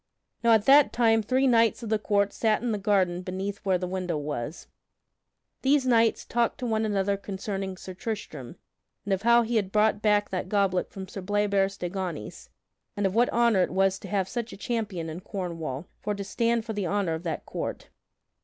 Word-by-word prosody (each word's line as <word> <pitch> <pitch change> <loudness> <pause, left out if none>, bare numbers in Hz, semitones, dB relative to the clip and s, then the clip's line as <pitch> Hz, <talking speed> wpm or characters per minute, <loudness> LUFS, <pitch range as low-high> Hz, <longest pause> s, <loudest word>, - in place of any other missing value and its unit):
Now 230 -1 +6
at 220 -1 +3
that 280 +1 +7
time 225 -2 +3
three 255 +5 +1
knights 230 -2 +3
of 225 - -5
the 220 -1 +1
court 200 -1 +1
sat 220 0 +1
in 240 - 0
the 210 - -1
garden 190 -3 +1
beneath 190 +2 -4
where 190 -2 +1
the 180 - -3
window 180 -3 -2
was. 145 +1 -5 1.0
These 270 0 +3
knights 230 -2 +3
talked 235 0 0
to 255 - -5
one 220 -1 0
another 200 -1 0
concerning 195 -1 -5
Sir 185 - -8
Tristram, 215 +3 -6 0.5
and 200 - 0
of 190 - -1
how 235 +1 +5
he 230 0 0
had 195 -3 -1
brought 210 0 +2
back 210 -1 +2
that 185 -1 -3
goblet 195 -3 +1
from 190 -1 -8
Sir 195 - -7
Bleoberis 200 0 +1
de 175 - -3
Ganys, 175 - -6 0.5
and 205 - 0
of 190 - +1
what 240 +3 +3
honor 235 -4 +3
it - - +1
was 195 +1 +1
to - - -9
have 195 -3 0
such 235 +1 -4
a - - -9
champion 205 -6 -3
in 160 +2 -6
Cornwall 170 - -5
for 210 0 -2
to 200 - -5
stand 230 +3 0
for 225 - -4
the 205 -3 -2
honor 195 -3 0
of 160 - -4
that 170 -2 -4
court. - - -5
200 Hz, 205 wpm, -27 LUFS, 185-225 Hz, 1.0 s, that